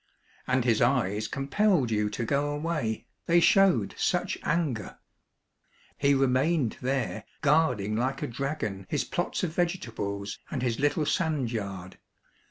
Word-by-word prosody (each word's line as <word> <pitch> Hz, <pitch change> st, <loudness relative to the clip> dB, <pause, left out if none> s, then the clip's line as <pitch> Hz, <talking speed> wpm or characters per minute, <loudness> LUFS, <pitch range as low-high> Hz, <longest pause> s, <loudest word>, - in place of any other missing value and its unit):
And 130 Hz, -1 st, +1 dB
his 115 Hz, -2 st, +3 dB
eyes 110 Hz, -4 st, +2 dB
com 135 Hz, +3 st, -4 dB
pelled 180 Hz, -, +2 dB
you 105 Hz, -1 st, +1 dB
to 115 Hz, +3 st, -3 dB
go 140 Hz, +4 st, +1 dB
away, 150 Hz, -8 st, -2 dB, 0.2 s
they 170 Hz, +1 st, +5 dB
showed 175 Hz, -, +4 dB
such -, -, 0 dB
anger; 140 Hz, -, -1 dB, 1.0 s
he 140 Hz, 0 st, +3 dB
remained 135 Hz, 0 st, +2 dB
there, 125 Hz, -4 st, -1 dB, 0.2 s
guarding 125 Hz, -9 st, +2 dB
like 130 Hz, +4 st, -1 dB
a -, -, -1 dB
dragon 115 Hz, -7 st, -4 dB
his -, -, 0 dB
plots -, -, -2 dB
of 165 Hz, -3 st, -1 dB
vegetables 115 Hz, -, -2 dB
and 130 Hz, -4 st, -3 dB
his 120 Hz, -3 st, -1 dB
little 145 Hz, +2 st, +1 dB
sand 155 Hz, -, 0 dB
yard. 100 Hz, -5 st, -5 dB
130 Hz, 140 wpm, -28 LUFS, 110-155 Hz, 1.0 s, they